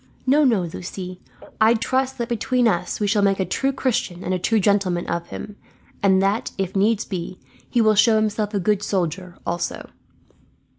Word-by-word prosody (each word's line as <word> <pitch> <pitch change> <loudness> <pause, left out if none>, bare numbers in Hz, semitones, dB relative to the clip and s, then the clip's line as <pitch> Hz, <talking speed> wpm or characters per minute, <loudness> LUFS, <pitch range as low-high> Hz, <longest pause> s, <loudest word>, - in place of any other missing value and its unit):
"No, 285 +3 +4
no, 235 -8 +3
Lucie, 180 +2 -7 0.4
I 225 +2 +5
trust 260 +3 -1
that 235 -2 -2
between 240 +1 +1
us 175 -6 -1
we 210 - 0
shall 205 0 +2
make 200 -1 +2
a 190 - +1
true 270 +7 0
Christian 245 -9 -2
and 185 - -1
a 185 - 0
true 225 +5 +2
gentleman 190 -3 +1
of 170 0 -3
him; 205 -1 -8 0.4
and 190 -1 +4
that, 200 +3 0
if 195 -1 -3
needs 205 +2 +2
be, 180 -2 -5 0.3
he 240 - +2
will 215 -1 +5
show 220 +2 +5
himself 215 -1 0
a - - +2
good 205 +2 +1
soldier, 180 -2 -2
also." 170 0 -3
205 Hz, 185 wpm, -22 LUFS, 185-230 Hz, 0.4 s, I